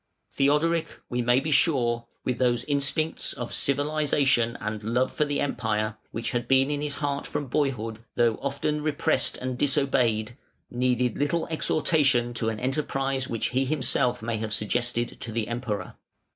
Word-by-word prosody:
Theodoric, 150 Hz, +4 st, +2 dB, 0.2 s
we 125 Hz, 0 st, 0 dB
may 120 Hz, +1 st, +4 dB
be 155 Hz, +3 st, -3 dB
sure, 120 Hz, -6 st, +2 dB, 0.2 s
with 125 Hz, -2 st, -1 dB
those 120 Hz, -2 st, +2 dB
instincts 145 Hz, +2 st, 0 dB
of 120 Hz, -3 st, -6 dB
civilisation 140 Hz, -4 st, +2 dB
and 110 Hz, 0 st, -4 dB
love 120 Hz, +4 st, +1 dB
for 150 Hz, -, +1 dB
the 145 Hz, -1 st, -1 dB
Empire 110 Hz, -5 st, -1 dB
which 115 Hz, 0 st, -3 dB
had 120 Hz, 0 st, -2 dB
been 135 Hz, +2 st, +4 dB
in 145 Hz, 0 st, -1 dB
his 150 Hz, -1 st, -2 dB
heart 145 Hz, -1 st, -2 dB
from 145 Hz, -, -3 dB
boyhood, 120 Hz, -5 st, -1 dB, 0.2 s
though 120 Hz, -2 st, +2 dB
often 140 Hz, +2 st, -1 dB
repressed 145 Hz, -3 st, +1 dB
and 130 Hz, -1 st, -4 dB
disobeyed, 125 Hz, -5 st, +1 dB, 0.4 s
needed 125 Hz, -1 st, +1 dB
little 160 Hz, +4 st, +1 dB
exhortation 140 Hz, -6 st, +2 dB
to 115 Hz, -1 st, 0 dB
an 110 Hz, -1 st, -4 dB
enterprise 135 Hz, 0 st, -1 dB
which 115 Hz, -, -1 dB
he 130 Hz, -, 0 dB
may -, -, +1 dB
himself 130 Hz, -4 st, +1 dB
have 110 Hz, -1 st, -2 dB
suggested 120 Hz, +2 st, -1 dB
to 115 Hz, -, -4 dB
the 110 Hz, -1 st, -2 dB
Emperor. 120 Hz, -4 st, -3 dB
125 Hz, 160 wpm, -26 LUFS, 120-145 Hz, 0.4 s, may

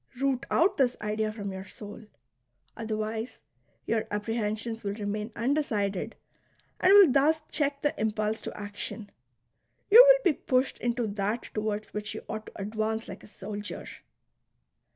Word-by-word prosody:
Root 275 Hz, -1 st, 0 dB
out 385 Hz, +3 st, +3 dB
this 250 Hz, -4 st, +2 dB
idea 215 Hz, 0 st, -1 dB
from 205 Hz, -2 st, -5 dB
your 190 Hz, 0 st, -6 dB
soul; 210 Hz, +3 st, -10 dB, 0.7 s
otherwise 220 Hz, +1 st, -3 dB, 0.5 s
your 225 Hz, -1 st, 0 dB
apprehensions 225 Hz, +1 st, -2 dB
will 200 Hz, 0 st, -2 dB
remain 210 Hz, +1 st, -3 dB
undecided 225 Hz, -7 st, -1 dB, 0.6 s
and 370 Hz, -, +5 dB
will 395 Hz, -7 st, +9 dB
thus 300 Hz, +4 st, +3 dB
check 285 Hz, -1 st, -1 dB
the 295 Hz, -, +2 dB
impulse 215 Hz, 0 st, -1 dB
to -, -, -7 dB
action. 205 Hz, +1 st, -6 dB, 0.8 s
You 470 Hz, +4 st, +12 dB
will -, -, +6 dB
be 350 Hz, -, +4 dB
pushed 255 Hz, +1 st, 0 dB
into 240 Hz, 0 st, 0 dB
that 205 Hz, +2 st, -3 dB
towards 215 Hz, 0 st, -3 dB
which 210 Hz, 0 st, -4 dB
you -, -, -7 dB
ought 215 Hz, 0 st, -5 dB
to -, -, -9 dB
advance 220 Hz, +2 st, -2 dB
like -, -, -8 dB
a -, -, -14 dB
soldier. 205 Hz, 0 st, -7 dB
220 Hz, 145 wpm, -28 LUFS, 210-260 Hz, 0.8 s, You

